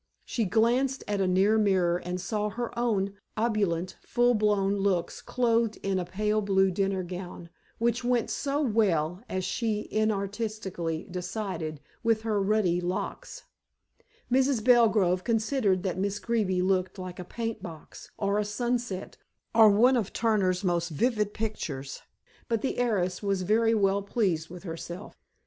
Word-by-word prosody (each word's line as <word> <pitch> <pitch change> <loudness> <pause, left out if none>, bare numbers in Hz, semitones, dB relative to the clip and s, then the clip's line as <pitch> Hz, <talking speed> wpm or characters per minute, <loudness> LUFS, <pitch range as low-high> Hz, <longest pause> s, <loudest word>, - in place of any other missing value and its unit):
She 230 - -1
glanced 240 +6 +2
at 205 -1 0
a 190 - +2
near 195 +4 +3
mirror 185 -4 +3
and 180 0 -4
saw 210 +3 -2
her 235 +3 -4
own 210 -5 0 0.2
opulent, 200 -6 0
full 245 0 +2
blown 205 -3 +2
looks 190 -3 0
clothed 230 -3 +1
in 195 -1 0
a 180 - -2
pale 210 +4 0
blue 195 -1 +3
dinner 195 0 0
gown, 180 -1 -7 0.3
which 235 +1 0
went 245 -1 +1
so 285 +1 -1
well 190 - +1
as 185 -1 -2
she 210 +1 -1
inartistically 200 -5 -2
decided, 180 -5 -4 0.2
with 225 -1 +1
her 215 -3 0
ruddy 195 -4 +2
locks, 180 - -4 0.9
Mrs. 260 -2 +2
Belgrove 215 -7 +4
considered 225 -4 +1
that 185 -2 -2
Miss 200 +1 -1
Greeby 195 -3 0
looked 185 +1 0
like 185 -1 -7
a - - -4
paint 225 +4 -4
box, 165 -5 -10
or 200 0 +1
a - - +1
sunset, 235 -2 -3 0.4
or 220 -1 +8
one 240 +6 +5
of 225 -6 -1
Turner's 200 -5 +1
most 175 -2 0
vivid 210 - 0
pictures, 150 -12 -4 0.5
but 230 -2 -1
the 270 - -1
heiress 185 -7 0
was 195 -2 0
very 225 +4 +3
well 200 -1 +2
pleased 190 -6 -1
with 180 +1 -10
herself. 175 +2 -7
200 Hz, 150 wpm, -28 LUFS, 185-225 Hz, 0.9 s, or